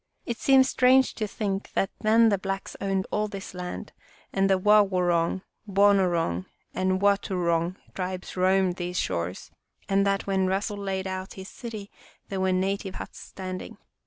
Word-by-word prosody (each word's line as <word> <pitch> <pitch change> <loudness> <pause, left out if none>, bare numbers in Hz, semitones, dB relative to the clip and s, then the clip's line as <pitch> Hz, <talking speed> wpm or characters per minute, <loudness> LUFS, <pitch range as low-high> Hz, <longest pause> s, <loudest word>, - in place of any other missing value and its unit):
It 235 -1 -4
seems 265 -1 +5
strange 260 0 +4
to 215 - -3
think 200 -1 -3
that 195 - 0
then 225 +1 +5
the 200 -2 +1
blacks 195 0 -4
owned 195 -1 0
all 210 0 0
this 195 -2 -8
land 180 -1 -6 0.4
and 195 0 +2
the 190 - +4
Wawoorong, 185 -3 +3 0.2
Boo 200 +1 +5
noorong, 170 - +1 0.3
and 185 0 +1
Wautourong 180 -4 +1 0.2
tribes 185 0 -5
roamed 185 0 +2
these 180 0 -3
shores, 85 +2 -3 0.4
and 195 0 +3
that 195 0 0
when 190 -1 +1
Russell 200 +2 -1
laid 195 -1 -3
out 190 0 -5
his 190 +1 -8
city 215 -4 -8 0.4
there 195 - -3
were 190 0 +2
native 190 +1 -1
huts - - -8
standing. 185 -1 -7
195 Hz, 160 wpm, -26 LUFS, 185-200 Hz, 0.4 s, seems